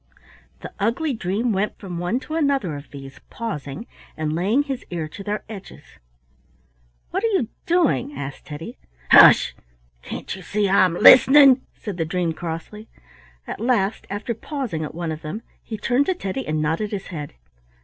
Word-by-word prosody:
The - - -8
ugly 250 +8 0
dream 220 +3 -1
went 200 +2 -1
from 180 -4 -6
one 175 +8 -1
to 310 - -8
another 280 - 0
of 145 0 -10
these, 135 -1 -11
pausing, 150 -7 -5 0.3
and 155 -1 -2
laying 200 - +2
his 270 -3 -5
ear 165 -3 -3
to 200 +6 -9
their 210 +1 -3
edges. 205 -3 -10 1.3
"What 380 - -2
are - - +3
you 380 - 0 0.2
doing?" 330 -5 +1
asked 135 0 -7
Teddy. 160 +10 -8 0.3
"Hush! - - +8 0.5
can't - - -6
you 190 - -10
see 205 +4 0
I'm 185 -2 +4
listening?" 265 +5 +8
said 205 -5 -7
the 165 - -1
dream 170 0 -1
crossly. 170 +7 -7 0.6
At - - -6
last, 225 -3 0
after 205 +4 -3
pausing 230 - -4
at 155 - -7
one 170 -1 -3
of 155 0 -6
them, 170 +9 -6 0.2
he 220 - -6
turned 245 +6 +1
to 375 - +1
Teddy 265 - -4
and 155 0 0
nodded 165 +8 -1
his 200 -2 -5
head. 150 -5 -7
200 Hz, 170 wpm, -22 LUFS, 165-245 Hz, 1.3 s, Hush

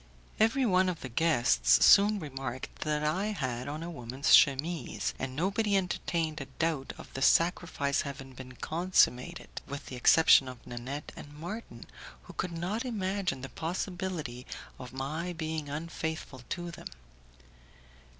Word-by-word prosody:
Every 240 +5 +3
one 185 -3 +3
of 175 - -4
the 130 - -6
guests 115 - +4
soon 205 +1 +7
remarked 135 -5 -5
that 150 -1 -1
I 185 +7 0
had 130 - -3
on 150 +3 -4
a 170 - -5
woman's 130 -1 0
chemise, 155 +4 +3
and 130 0 -4
nobody 200 +5 +1
entertained 170 -4 -1
a - - -5
doubt 160 -5 -1
of - - -12
the 135 - -5
sacrifice 165 -3 +2
having 135 -1 -7
been 130 0 -10
consummated, 160 -4 0
with 140 0 -6
the 130 - -7
exception 135 +1 +6
of 125 -2 -9
Nanette 125 +5 -6
and 145 - -10
Marton, 170 - -7 0.4
who - - -12
could 170 -3 -3
not 195 +7 -2
imagine 195 - -2
the 135 - -6
possibility 170 -6 -4 0.3
of 125 -1 -8
my 155 +7 -3
being 160 -2 -4
unfaithful 160 -3 -4
to 175 -1 -4
them. 170 - -8
155 Hz, 145 wpm, -30 LUFS, 135-180 Hz, 0.4 s, soon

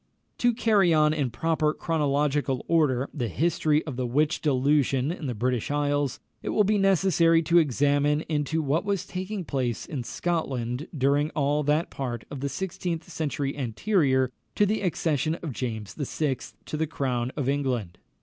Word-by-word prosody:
To 245 - +4
carry 210 -7 +3
on 150 0 +4
in 145 -5 0
proper 155 +5 0
chronological 145 -4 0
order 145 -6 +2
the 125 -6 -2
history 155 - +1
of 140 -6 -5
the 125 -1 -1
witch 150 +6 +1
delusion 140 -1 +2
in 170 -4 -5
the 125 - -3
British 125 +1 -1
isles, 145 -2 0 0.2
it - - -4
will 210 - +3
be 210 +1 +2
necessary 175 -4 +4
to 170 +2 +5
examine 145 0 +2
into 160 0 -1
what 145 +4 +1
was 200 -2 -1
taking 185 +1 -4
place 130 -6 -2
in 135 -5 -4
Scotland 135 -3 -2
during 140 +3 +2
all 145 0 +1
that 150 +3 +1
part 120 -4 -4
of 145 - -5
the 140 +1 -2
sixteenth 170 +1 -4
century 145 -3 -2
anterior 130 - +1 0.2
to 205 - +4
the 215 +2 0
accession 160 -4 0
of 165 -5 -6
James 110 -5 -4
VI. 145 -2 -1 0.3
to - - -5
the 160 +1 0
crown 130 -5 -2
of 140 -4 -1
England. 125 -10 -1
145 Hz, 165 wpm, -26 LUFS, 130-165 Hz, 0.3 s, to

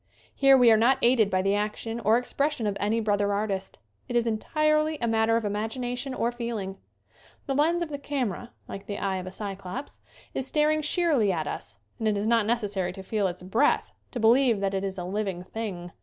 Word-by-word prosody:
Here 275 -1 +6
we 245 -2 +6
are 220 - +6
not 245 +4 +4
aided 235 -4 +4
by 185 -1 +1
the 195 +1 +2
action 215 +2 -2
or 225 0 +4
ex 245 - -5
pression 285 -5 0
of 205 -1 0
any 215 +3 +1
brother 205 -2 +1
artist. 200 -2 -2 0.3
It 240 - -3
is 235 -1 +3
entirely 305 +7 +1
a 235 - -1
matter 225 0 +3
of 230 - -2
imagination 245 +5 -3
or 235 -1 0
feeling. 230 -5 -4 0.7
The 275 - -1
lens 330 +5 +2
of 335 - -6
the 285 -1 -5
camera, 250 -6 -3 0.2
like 195 +1 -8
the 205 - -4
eye 195 -1 -1
of 185 0 -6
a - - -6
Cyclops, 195 +5 -6 0.3
is 265 - -2
staring 310 0 +2
sheerly 300 - +2
at 160 -4 -2
us 100 -8 -6 0.2
and 220 - 0
it 210 -1 +2
is 200 - -1
not 225 -2 +3
necessary 205 -6 0
to 190 - -9
feel 205 0 0
its 180 0 -6
breath 225 +10 +2 0.2
to 245 - -5
believe 235 0 +4
that 195 0 -1
it 195 0 -1
is 195 -1 -3
a 180 - -4
living 190 -1 -3
thing. 185 -4 -6
220 Hz, 215 wpm, -27 LUFS, 195-250 Hz, 0.7 s, Here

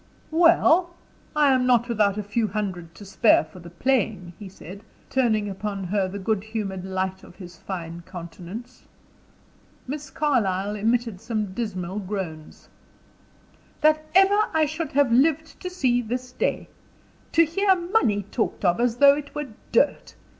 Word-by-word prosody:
"Well? 345 +1 +4 0.4
I 295 -3 +4
am 255 -1 +2
not 240 -1 +3
without 210 -4 +1
a 210 - -2
few 215 +2 -1
hundred 185 -6 -4
to 205 - -11
spare 205 +1 +4
for 160 +4 -14
the 170 -1 -11
playing," 195 -3 -1
he 205 -2 -8
said, 190 +1 -11 0.3
turning 220 -5 +1
upon 200 0 -4
her 190 +1 0
the 190 +2 -6
good 200 0 -1
humored 210 -4 -4
light 190 0 -3
of - - -15
his 180 -3 -11
fine 170 -3 -6
countenance. 185 +7 -10 1.0
Miss 290 +2 -6
Carlyle 210 -10 0
emitted 225 -1 0
some 215 -4 -3
dismal 190 -4 -4
groans. 185 -6 -6 1.1
"That 310 0 +4
ever 390 +2 +6 0.2
I 315 -1 +4
should 315 +2 -4
have 280 -3 +3
lived 310 +5 +2
to 365 - -5
see 255 -9 +1
this 250 +2 -5
day! - - -2 0.7
To 330 0 +6
hear 385 +4 +2
money 345 - +1
talked 220 -3 -2
of 175 +2 +3
as 240 -1 +1
though 280 +1 +7
it 290 -1 -8
were 295 -2 -4 0.2
dirt. 280 +5 +1
220 Hz, 155 wpm, -24 LUFS, 190-280 Hz, 1.1 s, though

